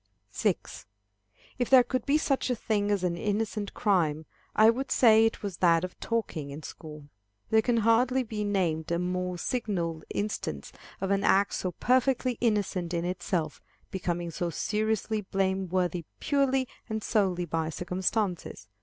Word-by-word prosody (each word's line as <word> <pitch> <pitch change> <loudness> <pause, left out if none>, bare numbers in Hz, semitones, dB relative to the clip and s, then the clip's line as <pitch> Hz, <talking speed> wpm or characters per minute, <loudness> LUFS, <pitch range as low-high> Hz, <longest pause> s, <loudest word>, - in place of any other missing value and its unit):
6. 105 - -2 0.7
If 245 - 0
there 260 -2 +8
could 255 +1 -3
be 285 +2 +4
such 275 -4 0
a 250 - +1
thing 210 -2 -1
as 200 -3 +1
an 175 -1 0
innocent 210 +2 -2
crime, 160 -8 +1 0.3
I 220 +1 +7
would 265 +4 -4
say 225 -2 +6
it 225 - -5
was 195 -4 -4
that 170 -2 +4
of 185 - -6
talking 200 -11 -2
in 145 +3 -8
school. 150 -2 -9 0.5
There 220 0 +5
can 235 +1 +1
hardly 240 +4 +3
be 215 -2 -4
named 175 -6 0
a 170 - +2
more 180 0 -2
signal 175 -8 -2
instance 200 - -3 0.3
of 195 0 -1
an 200 0 +2
act 200 +1 +3
so 180 -1 -2
perfectly 255 +2 +1
innocent 200 -6 0
in 170 0 -1
itself, 175 -3 -2 0.3
becoming 175 -2 -2
so 175 +2 -2
seriously 215 +4 -1
blame 190 -1 -1
worthy 180 -2 0
purely 270 -2 +1 0.2
and 220 -1 -3
solely 185 -4 +1
by 160 -1 -2
circumstances. 180 - -2
195 Hz, 155 wpm, -28 LUFS, 175-225 Hz, 0.7 s, there